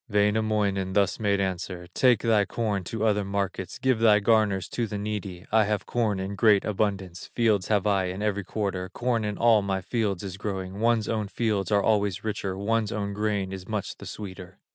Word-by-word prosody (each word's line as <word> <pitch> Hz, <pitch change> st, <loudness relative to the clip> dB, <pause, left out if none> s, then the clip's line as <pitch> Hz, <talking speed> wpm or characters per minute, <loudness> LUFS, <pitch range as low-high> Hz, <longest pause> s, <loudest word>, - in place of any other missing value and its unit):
Wainamoinen 105 Hz, -2 st, +1 dB
thus 100 Hz, -2 st, +2 dB
made 100 Hz, -2 st, +1 dB
answer: 90 Hz, -2 st, -3 dB
"Take 125 Hz, -4 st, +4 dB
thy 110 Hz, -3 st, +4 dB
corn 105 Hz, -2 st, -2 dB
to 110 Hz, +4 st, -2 dB
other 105 Hz, -1 st, +2 dB
markets, 100 Hz, -1 st, -3 dB
Give 130 Hz, -3 st, +1 dB
thy 110 Hz, -2 st, +6 dB
garners 105 Hz, -3 st, +2 dB
to 120 Hz, -2 st, -2 dB
the 105 Hz, -, -4 dB
needy; 100 Hz, -3 st, -5 dB
I 110 Hz, -1 st, +4 dB
have 105 Hz, 0 st, -1 dB
corn 110 Hz, -5 st, 0 dB
in 95 Hz, +1 st, -3 dB
great 100 Hz, 0 st, +4 dB
abundance, 100 Hz, -3 st, -2 dB
Fields 110 Hz, -5 st, +2 dB
have 105 Hz, -3 st, +1 dB
I 100 Hz, -2 st, +2 dB
in 95 Hz, +3 st, -4 dB
every 100 Hz, -1 st, 0 dB
quarter, 95 Hz, -3 st, -3 dB
Corn 120 Hz, -2 st, -1 dB
in 105 Hz, -1 st, -3 dB
all 115 Hz, -2 st, +5 dB
my 100 Hz, -1 st, -1 dB
fields 105 Hz, -3 st, -1 dB
is 95 Hz, -1 st, -6 dB
growing; 95 Hz, -1 st, -4 dB
One's 115 Hz, -1 st, +2 dB
own 110 Hz, -2 st, -1 dB
fields 105 Hz, -2 st, -1 dB
are 100 Hz, -1 st, +3 dB
always 105 Hz, -4 st, +1 dB
richer, 100 Hz, -3 st, -3 dB
One's 110 Hz, +2 st, 0 dB
own 100 Hz, -1 st, -3 dB
grain 100 Hz, -2 st, -1 dB
is 95 Hz, -1 st, -8 dB
much 105 Hz, -3 st, -3 dB
the -, -, -10 dB
sweeter." 95 Hz, -2 st, -8 dB
105 Hz, 195 wpm, -26 LUFS, 95-110 Hz, -, thy